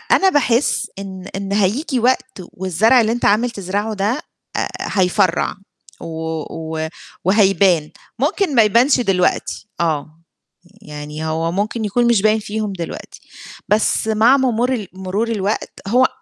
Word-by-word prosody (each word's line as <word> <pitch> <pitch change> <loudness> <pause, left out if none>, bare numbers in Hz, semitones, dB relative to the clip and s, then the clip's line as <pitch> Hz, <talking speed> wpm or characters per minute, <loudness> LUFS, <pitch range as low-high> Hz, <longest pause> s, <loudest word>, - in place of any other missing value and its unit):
أنا 385 - +4
باحس 270 -5 +1
إن 190 -2 -8
إن 195 0 -3
هييجيي 235 - +1
وقت 255 -2 0
والزرع 205 +7 +3
اللي 220 - +1
أنت 240 +1 -1
عامل 215 +4 +3
تزرعه 205 +2 -3
ده، 210 +7 -1 0.4
آآ - - 0
هيفرّع 185 -2 +1 0.5
و - - -6 0.4
و 160 0 -4 0.4
وهيبان، 190 -5 +3 0.3
ممكن 380 -9 0
ما 230 - +7
يبانش 235 +6 +4
دلوقتي 195 -1 0
آه، 155 -1 -2 0.6
يعني 150 0 -7
هو 160 +1 -1
ممكن 210 +4 -2
يكون 240 +4 +1
مش 235 -4 +3
باين 215 +1 +3
فيهم 210 -1 -4
دلوقتي، 170 -3 -7 0.5
بس 215 +1 +2
مع 220 +5 +4
مرور 245 -2 0
مرور 190 +4 -2
الوقت، 205 0 -2 0.2
هو 250 +4 +4
205 Hz, 135 wpm, -19 LUFS, 185-235 Hz, 0.6 s, ما